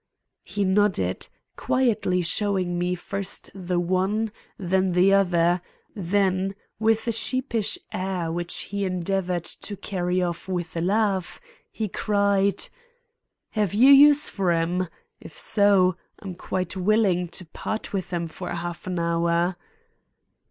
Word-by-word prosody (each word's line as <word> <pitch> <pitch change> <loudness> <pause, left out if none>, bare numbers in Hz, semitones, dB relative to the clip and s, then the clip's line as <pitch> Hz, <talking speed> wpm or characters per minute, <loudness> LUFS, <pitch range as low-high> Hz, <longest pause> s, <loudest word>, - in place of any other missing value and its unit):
He 205 - -2
nodded, 190 - +1 0.3
quietly 215 -8 +1
showing 185 -1 0
me 180 +1 0
first 195 +2 -5
the 180 -2 -2
one, 190 +5 0 0.3
then 190 0 +1
the 185 +2 +5
other; 175 -2 +3 0.3
then 195 0 0 0.2
with 225 +1 +2
a - - +3
sheepish 230 -1 -1 0.2
air 185 -3 -2
which 175 +1 -2 0.2
he 200 0 -1
endeavored 185 -1 -1
to 205 +3 -4
carry 180 -2 -1
of 175 -1 -2
with 175 -3 -3
a 165 - -1
laugh, 195 0 0 0.3
he 220 - -3
cried: 200 -1 +1 0.8
"Have 205 -4 0
you 255 +6 +7
use 290 +1 +7
for 195 -3 -1
'em? 170 +2 0 0.3
If 160 - -12
so, 195 -3 +3 0.2
I'm 195 -3 -7
quite 180 +1 -3
willing 190 -2 +2
to 180 +2 -7
part 215 +7 -5
with 190 -2 -3
'em 170 -1 -1
for 170 +3 -7
a - - -3
half 175 +1 -6
hour." 170 0 +1
185 Hz, 130 wpm, -25 LUFS, 175-205 Hz, 0.8 s, you